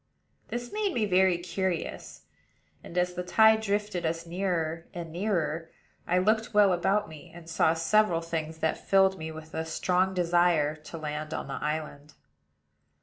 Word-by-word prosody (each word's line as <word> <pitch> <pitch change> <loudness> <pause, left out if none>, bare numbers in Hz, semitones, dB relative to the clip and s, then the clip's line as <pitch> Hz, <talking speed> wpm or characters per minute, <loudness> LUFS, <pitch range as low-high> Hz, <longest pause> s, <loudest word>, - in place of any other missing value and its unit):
This 240 0 -5
made 420 -3 -1
me 220 - +2
very 185 -2 +3
curious; 175 0 -4 0.6
and, 175 - -9
as 180 0 +1
the 180 - -3
tide 220 +4 +5
drifted 205 -3 -1
us 165 +1 -2
nearer 170 -2 -2
and 170 -2 -6
nearer, 165 -4 -1 0.4
I 180 - +2
looked 220 +4 +1
well 205 -3 +6
about 195 +4 +1
me, 155 -2 -12
and 170 -1 -13
saw 165 -1 +2
several 170 +1 +2
things 160 -1 -4
that 160 - -1
filled 190 -1 +4
me 160 0 -5
with 160 0 -11
a 160 - -2
strong 180 +3 0
desire 175 -4 +2
to 155 +2 -10
land 155 0 -4
on - - -4
the 135 - -5
island. 150 -1 -4
175 Hz, 160 wpm, -28 LUFS, 160-190 Hz, 0.6 s, well